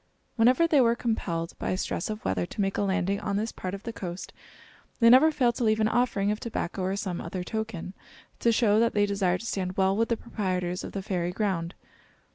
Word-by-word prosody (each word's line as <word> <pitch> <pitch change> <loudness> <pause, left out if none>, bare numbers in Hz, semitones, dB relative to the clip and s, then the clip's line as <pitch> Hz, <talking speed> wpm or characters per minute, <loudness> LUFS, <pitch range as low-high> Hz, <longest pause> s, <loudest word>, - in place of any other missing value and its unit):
Whenever 250 +8 +4
they 310 -5 +4
were 235 -1 +4
compelled 175 -9 -2
by - - -1
stress 185 - -3
of 215 0 -5
weather 90 -2 0
to - - -11
make 195 -1 +1
a - - 0
landing 195 0 0
on 200 -1 -2
this 220 +2 -2
part 185 +1 -5
of 200 - -10
the 230 - -5
coast, 180 -2 -6 0.7
they 230 -1 +7
never 285 +6 +7
failed 250 -6 +2
to 240 - -3
leave 215 -1 +2
an 215 - +3
offering 220 -4 +1
of 210 - -2
tobacco 200 -5 -4
or 190 +1 -1
some 190 -3 -3
other 180 +2 -4
token, 220 -3 -4 0.5
to 235 - +3
show 215 -2 +3
that 230 -1 +2
they 205 0 +4
desired 195 -3 0
to - - -8
stand 185 -4 -3
well 190 0 +3
with 225 +2 +1
the 230 - +1
proprietors 185 -5 -3
of - - -7
the 195 - -4
fairy 180 -2 -1
ground. 180 -3 -2
200 Hz, 225 wpm, -27 LUFS, 185-230 Hz, 0.7 s, they